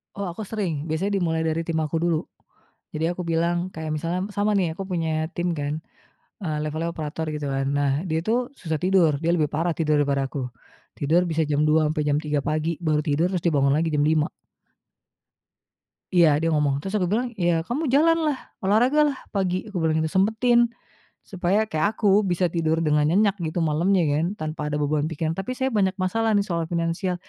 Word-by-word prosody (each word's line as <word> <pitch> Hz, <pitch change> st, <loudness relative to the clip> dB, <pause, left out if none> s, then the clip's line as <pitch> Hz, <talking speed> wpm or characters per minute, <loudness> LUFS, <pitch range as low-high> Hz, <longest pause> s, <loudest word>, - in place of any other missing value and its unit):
Oh, 200 Hz, -, -3 dB
aku 215 Hz, -, -6 dB
sering, 170 Hz, -9 st, -3 dB
biasanya 195 Hz, +6 st, 0 dB
dimulai 160 Hz, -2 st, 0 dB
dari 160 Hz, 0 st, 0 dB
tim 160 Hz, -1 st, 0 dB
aku 155 Hz, +1 st, -2 dB
dulu. 170 Hz, -2 st, +1 dB, 0.7 s
Jadi 155 Hz, +1 st, -1 dB
aku 180 Hz, 0 st, -5 dB
bilang 170 Hz, +2 st, 0 dB
kayak 160 Hz, -1 st, -5 dB
misalnya 170 Hz, +4 st, -2 dB
sama 205 Hz, +1 st, +1 dB
nih 180 Hz, -4 st, +1 dB
aku 195 Hz, -, -5 dB
punya 165 Hz, -2 st, -1 dB, 0.3 s
tim 175 Hz, 0 st, 0 dB
kan, 145 Hz, +1 st, -2 dB, 0.7 s
eee, 155 Hz, -3 st, -2 dB
levelnya 155 Hz, +2 st, -2 dB
operator 155 Hz, 0 st, -4 dB
gitu 150 Hz, -1 st, -4 dB
kan. 135 Hz, 0 st, -1 dB
Nah 140 Hz, -1 st, +2 dB, 0.2 s
dia 160 Hz, 0 st, 0 dB
tuh 245 Hz, +4 st, 0 dB
susah 160 Hz, -2 st, -2 dB
tidur, 180 Hz, -3 st, +4 dB
dia 165 Hz, -, +1 dB
lebih 150 Hz, -3 st, +1 dB
parah 165 Hz, +3 st, 0 dB
tidur 155 Hz, -2 st, +2 dB
daripada 140 Hz, -2 st, 0 dB
aku, 140 Hz, -, -5 dB, 0.6 s
tidur 160 Hz, +5 st, +3 dB
bisa 160 Hz, 0 st, +1 dB
jam 145 Hz, 0 st, +2 dB
2.00 155 Hz, 0 st, +3 dB
sampai 155 Hz, -1 st, -1 dB
jam 145 Hz, 0 st, +2 dB
3.00 150 Hz, -2 st, -1 dB
pagi 155 Hz, +1 st, -1 dB
baru 155 Hz, -2 st, +2 dB
tidur, 155 Hz, +3 st, +1 dB
terus 180 Hz, -3 st, -2 dB
dibangun 140 Hz, -4 st, +3 dB
lagi 165 Hz, +1 st, +1 dB
jam 145 Hz, 0 st, +2 dB
5.00. 155 Hz, +1 st, +2 dB, 1.9 s
Iya 170 Hz, -2 st, +7 dB
dia 165 Hz, -, +1 dB
ngomong, 145 Hz, -2 st, +2 dB
terus 195 Hz, +6 st, -6 dB
aku 180 Hz, -3 st, 0 dB
bilang, 240 Hz, +4 st, +1 dB
"Ya 175 Hz, -3 st, +1 dB, 0.2 s
kamu 270 Hz, +7 st, -2 dB
jalanlah, 315 Hz, -2 st, +3 dB, 0.3 s
olahragalah 260 Hz, +8 st, +3 dB, 0.2 s
pagi," 185 Hz, 0 st, -1 dB
kubilang 160 Hz, -5 st, 0 dB
gitu, 160 Hz, -, 0 dB
"Sempetin 220 Hz, +5 st, +3 dB, 0.6 s
supaya 190 Hz, +3 st, 0 dB
kayak 200 Hz, +8 st, 0 dB
aku 210 Hz, -, 0 dB, 0.2 s
bisa 180 Hz, +1 st, +1 dB
tidur 160 Hz, -1 st, +1 dB
dengan 150 Hz, 0 st, +3 dB
nyenyak 200 Hz, +4 st, +3 dB
gitu 160 Hz, +3 st, -2 dB
malamnya 170 Hz, +5 st, +2 dB
kan 150 Hz, +3 st, +1 dB
tanpa 155 Hz, -1 st, -4 dB
ada 150 Hz, -, -2 dB
beban 150 Hz, +1 st, 0 dB
pikiran." 160 Hz, 0 st, -2 dB
"Tapi 195 Hz, +6 st, -3 dB
saya 265 Hz, +1 st, 0 dB
banyak 195 Hz, -4 st, +1 dB
masalah 225 Hz, +4 st, 0 dB
nih 200 Hz, -, +3 dB
soal 170 Hz, -2 st, -1 dB
finansial," 170 Hz, +2 st, -1 dB
165 Hz, 190 wpm, -24 LUFS, 155-190 Hz, 1.9 s, Iya